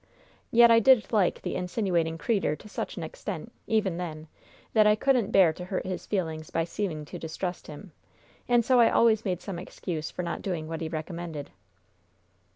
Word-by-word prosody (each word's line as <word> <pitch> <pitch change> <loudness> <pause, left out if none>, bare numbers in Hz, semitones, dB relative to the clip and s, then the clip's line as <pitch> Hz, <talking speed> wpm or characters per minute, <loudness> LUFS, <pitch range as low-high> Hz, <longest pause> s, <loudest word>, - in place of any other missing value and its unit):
Yet 235 0 +7
I 230 - +7
did 240 0 +4
like 200 -5 +2
the - - -3
insiniwating 180 -3 -1
creetur' 195 -5 0
to 210 - -14
such - - -5
an - - -4
extent, - - -6 0.2
even 205 -6 +1
then, 160 -3 -6 0.5
that 215 -1 +5
I 210 - +5
couldn't 245 -2 +2
bear 185 -6 +5
to 180 +2 -8
hurt 185 0 -3
his 185 -1 -5
feelings 160 -6 -2
by 165 - 0
seeming 165 -3 -4
to - - -8
distrust 175 +3 -5
him, 155 +5 -10 0.6
and 240 -2 +4
so 255 -1 +4
I 235 - +6
always 225 -1 +3
made 180 -3 -1
some 190 -4 -5
excuse 165 -3 -5
for 180 - -5
not 170 - -4
doing 170 -5 -3
what 165 0 -5
he 160 - -3
recommended. 160 -2 -6
180 Hz, 185 wpm, -27 LUFS, 165-215 Hz, 0.6 s, Yet